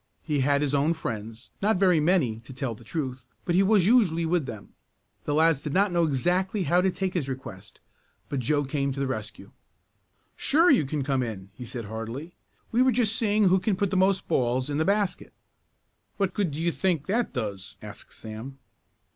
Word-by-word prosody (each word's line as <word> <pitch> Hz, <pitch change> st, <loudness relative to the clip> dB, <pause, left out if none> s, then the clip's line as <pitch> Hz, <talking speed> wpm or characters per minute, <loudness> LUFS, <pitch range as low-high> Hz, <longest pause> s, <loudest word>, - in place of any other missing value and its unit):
He 150 Hz, -3 st, -1 dB
had 140 Hz, +2 st, +2 dB
his 145 Hz, -1 st, -1 dB
own 145 Hz, +4 st, +2 dB
friends, 115 Hz, -5 st, -6 dB
not 210 Hz, 0 st, +2 dB
very 180 Hz, -3 st, +4 dB
many, 150 Hz, -9 st, +2 dB
to 125 Hz, +3 st, -12 dB
tell 130 Hz, -2 st, -3 dB
the 115 Hz, -, -14 dB
truth, 130 Hz, 0 st, -4 dB, 0.2 s
but 175 Hz, -, 0 dB
he 185 Hz, -, +5 dB
was 195 Hz, -2 st, +4 dB
usually 190 Hz, -8 st, +3 dB
with 165 Hz, -4 st, 0 dB
them. 110 Hz, -3 st, -9 dB, 0.5 s
The 145 Hz, -, 0 dB
lads 160 Hz, -2 st, +3 dB
did 150 Hz, -, -4 dB
not 200 Hz, +1 st, +3 dB
know 170 Hz, -1 st, +2 dB
exactly 180 Hz, -, 0 dB
how 175 Hz, +3 st, +3 dB
to 190 Hz, -, +2 dB
take 185 Hz, 0 st, -2 dB
his 150 Hz, -7 st, -2 dB
request, 120 Hz, -8 st, -8 dB, 0.5 s
but 140 Hz, -, -2 dB
Joe 145 Hz, +4 st, +1 dB
came 140 Hz, 0 st, -1 dB
to 135 Hz, -, -6 dB
the 140 Hz, -, 0 dB
rescue. 110 Hz, -6 st, -6 dB, 0.8 s
"Sure 330 Hz, +5 st, +4 dB
you 250 Hz, -, +4 dB
can 145 Hz, 0 st, -2 dB
come 135 Hz, -1 st, 0 dB
in," 100 Hz, -5 st, -5 dB
he 125 Hz, +4 st, -9 dB
said 115 Hz, -1 st, -6 dB
heartily. 115 Hz, -, -6 dB, 0.4 s
"We're 255 Hz, +3 st, +4 dB
just 225 Hz, -3 st, +3 dB
seeing 215 Hz, -1 st, +2 dB
who 190 Hz, -1 st, +4 dB
can 205 Hz, +1 st, 0 dB
put 195 Hz, 0 st, -1 dB
the -, -, 0 dB
most 190 Hz, 0 st, +2 dB
balls 125 Hz, +2 st, 0 dB
in 145 Hz, -, -1 dB
the 160 Hz, -, +2 dB
basket." 200 Hz, -1 st, 0 dB, 0.8 s
"What 195 Hz, -2 st, 0 dB
good 200 Hz, -5 st, 0 dB
do 145 Hz, +1 st, -6 dB
you 170 Hz, +1 st, +1 dB
think 170 Hz, -5 st, 0 dB
that 225 Hz, +5 st, 0 dB
does?" 100 Hz, -5 st, -5 dB
asked 105 Hz, -2 st, -9 dB
Sam. 110 Hz, +5 st, -8 dB
150 Hz, 200 wpm, -26 LUFS, 130-190 Hz, 0.8 s, he